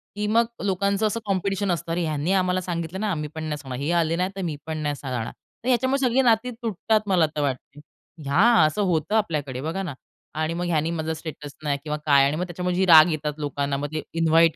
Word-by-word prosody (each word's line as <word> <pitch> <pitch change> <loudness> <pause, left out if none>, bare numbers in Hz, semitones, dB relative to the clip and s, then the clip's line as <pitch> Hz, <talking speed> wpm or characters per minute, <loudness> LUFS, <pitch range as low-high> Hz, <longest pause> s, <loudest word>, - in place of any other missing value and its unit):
की 210 0 -2
मग 230 +2 +3 0.2
लोकांचं 200 +2 +1
असं 230 - -2
कॉम्पिटिशन 195 0 0
असतं. 165 0 -3
अरे, 170 +1 0
ह्यांनी 155 +2 -1
आम्हाला 185 -1 +1
सांगितलं 170 0 -4
नाही, 215 -1 -1
आम्ही 150 -4 -3
पण 160 - -4
नाही 155 -1 -3
सांगणार. 130 -3 -7
हे 155 - 0
आले 165 -1 +2
नाही 180 +2 0
तर 195 - -4
मी 165 -5 -2
पण 160 0 -4
नाही 150 -1 -2
सांगणार. 125 -5 -4
तर 245 - -15
ह्याच्यामुळे 260 +2 +2
सगळी 250 +2 +3
नाती 240 0 +2
तुटतात 220 -2 0
मला 180 -4 +4
तर 150 - 0
वाटतं 135 -3 -1 0.2
आहे. - - -13 0.5
या 180 +10 +4 0.2
असं 155 +7 0
होतं 160 +5 0
आपल्याकडे 150 - -1
बघा 165 +6 -3
ना 175 - -4 0.5
आणि 160 +1 0
मग 175 +1 -2
ह्यानी 165 -1 0
माझा 160 -1 -2
स्टेटस 155 -2 -8
नाही 145 -2 0
किंवा 150 -1 -3
काय 140 -2 +5
आणि 140 +2 +1
मग 175 - -2
त्याच्यामुळे 180 +1 -2
जी 190 +1 +2
राग 160 -1 +8
येतात 150 -1 -2
लोकांना. 140 -1 -2
मग 145 +1 -3
ते 155 - -1 0.2
इन्व्हाईट 165 0 +4
165 Hz, 230 wpm, -24 LUFS, 150-195 Hz, 0.5 s, राग